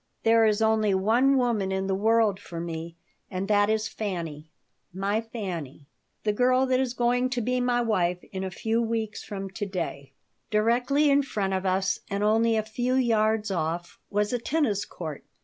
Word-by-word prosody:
"There 225 0 +5
is 215 +1 +2
only 215 -2 +3
one 240 +8 +3
woman 230 -6 +1
in 190 0 -1
the 195 - 0
world 215 0 +2
for 170 -4 -8
me, 165 0 -5 0.3
and 190 0 -3
that 205 0 +3
is 220 0 +1
Fanny, 165 -9 -5 0.4
my 200 +4 -1
Fanny, 180 - -6 0.4
the 210 - +1
girl 255 +3 +3
that 255 -1 +2
is 255 -2 -1
going 245 +1 +2
to 250 -1 -1
be 250 +2 0
my 245 -1 +2
wife 180 -6 +1
in 190 -2 -4
a 190 - -2
few 225 +5 -1
weeks 225 -2 -2
from 195 -2 -6
to 205 +2 -4
day 165 -7 -5 0.4
Directly 245 +7 +2
in 280 +1 +5
front 205 -8 -2
of 190 0 -1
us 190 +1 +1
and 200 +1 -1
only 225 +1 +3
a 215 - +1
few 245 +4 -1
yards 220 -4 +2
off 170 0 -3
was 210 +2 0
a 245 - +1
tennis 230 -6 0
court. 155 -5 -7
215 Hz, 185 wpm, -26 LUFS, 190-235 Hz, 0.4 s, There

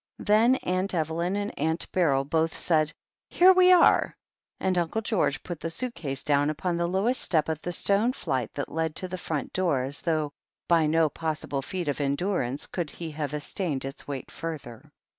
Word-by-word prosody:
Then 225 +5 +4
Aunt 185 +2 0
Evel)m 170 +3 -1
and 205 0 -4
Aunt 160 +3 0
Beryl 145 -7 +2
both 160 +2 0
said, 155 -3 +2 0.4
"Here 370 +2 +6
we 370 0 +6
are 360 -2 +5 0.2
!" - - -57
and 185 -1 0
Uncle 175 +5 0
George 205 -10 0
put 175 -3 -6
the 165 - -3
suit 240 +9 -1
case 135 - -5
down 145 0 +2
upon 170 +3 -2
the 170 0 0
lowest 200 +8 0
step 160 -4 +1
of 160 -1 -3
the 175 - -4
stone 200 +7 +2
flight 130 - -3
that 140 - -4
led 160 -1 -2
to 185 - -1
the 185 0 -5
front 155 -4 -4
door 170 -9 +1
as 135 +2 -5
though 155 -3 0 0.4
by 165 -2 +4
no 160 +1 +3
possible 155 -3 -3
feat 175 +3 -4
of 145 0 -1
endurance 140 -2 0
could 175 -4 -4
he 165 +1 -7
have 150 -1 -3
sustained 150 -1 -3
its 135 +1 -6
weight 140 -3 -6
further. 150 -9 -7
165 Hz, 195 wpm, -27 LUFS, 145-185 Hz, 0.4 s, Here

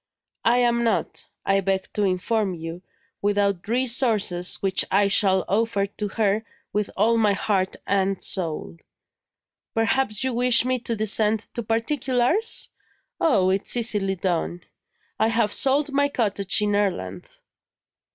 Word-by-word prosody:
I 235 +2 +4
am 235 -1 +2
not, 230 - -1 0.2
I 195 0 +2
beg 190 0 -2
to 210 - -2
inform 195 +1 0
you, 165 +1 -7 0.4
without 200 -2 0
resources 230 -7 +2
which 195 -1 0
I 200 +1 +3
shall 190 -1 +3
offer 210 -1 0
to 205 +1 -5
her 210 +1 0 0.3
with 210 -1 -1
all 225 +4 +3
my 210 -3 +3
heart 190 -1 -1
and 195 -1 0
soul. 155 - -2 1.0
Perhaps 225 -1 +1
you 260 -1 -1
wish 245 0 +3
me 255 0 0
to 235 -1 -3
descend 215 0 +1
to 235 - -3
particulars? 250 - 0 0.5
Oh, 200 - +3
it's 195 +5 +1
easily 205 -4 +2
done; 175 -1 -2 0.6
I 220 - +3
have 225 -2 +1
sold 280 +2 +2
my 285 +1 +2
cottage 205 -7 0
in 205 0 0
Ireland." 135 - -2
210 Hz, 135 wpm, -23 LUFS, 195-235 Hz, 1.0 s, I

